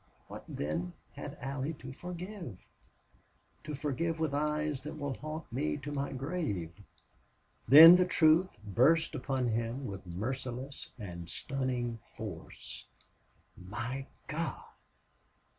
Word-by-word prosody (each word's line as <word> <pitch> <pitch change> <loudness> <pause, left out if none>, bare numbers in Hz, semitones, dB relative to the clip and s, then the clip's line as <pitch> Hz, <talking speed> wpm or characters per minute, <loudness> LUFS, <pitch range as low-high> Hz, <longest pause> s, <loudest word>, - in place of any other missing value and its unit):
What, - - -8
then, 85 +4 -2 0.2
had - - -7
Allie 140 +3 -2
to 130 -2 -9
forgive 180 - -7 1.0
to 150 -1 -4
forgive 160 +4 -1
with 160 -3 0
eyes 150 -1 0
that 150 +3 -6
will 145 -2 -2
haunt 155 -1 -7
me 75 - 0
to 145 - -6
my 140 -1 -2
grave?" 135 - -2 1.0
Then 160 +5 +12
the 180 - +4
truth 170 +1 +4
burst 140 - +4
upon 130 -3 0
him 115 +4 -1
with 100 -4 -6
merciless 125 +8 -4
and 85 -6 -7
stunning 125 -3 -2 0.2
force. - - -8 0.7
"My 120 +8 -5 0.2
God! 160 +3 -3
135 Hz, 115 wpm, -32 LUFS, 115-155 Hz, 1.0 s, Then